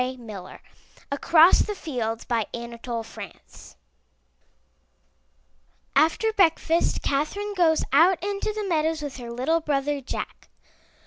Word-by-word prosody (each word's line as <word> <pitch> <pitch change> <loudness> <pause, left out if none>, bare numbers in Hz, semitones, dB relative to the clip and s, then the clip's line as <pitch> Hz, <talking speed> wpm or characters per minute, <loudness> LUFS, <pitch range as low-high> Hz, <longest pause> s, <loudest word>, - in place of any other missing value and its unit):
yHi^>{ 235 -7 -6 0.5
ACROSS 320 +4 +5
THE 420 - 0
FIELDS^ 235 - -4 0.3
Anatole 235 0 -5
France 225 - -12 2.2
After 320 +10 +3
breakfast 335 -4 +2
Catherine 400 +9 -1
goes 335 -4 +3
out 340 +6 +6
into 400 +2 -2
the 425 -1 -4
meadows 320 -2 0
with 285 -3 -6
her 240 -2 -8
little 265 +8 +1
brother 290 -1 -1
Jack. 255 - -7
305 Hz, 105 wpm, -25 LUFS, 250-345 Hz, 2.2 s, out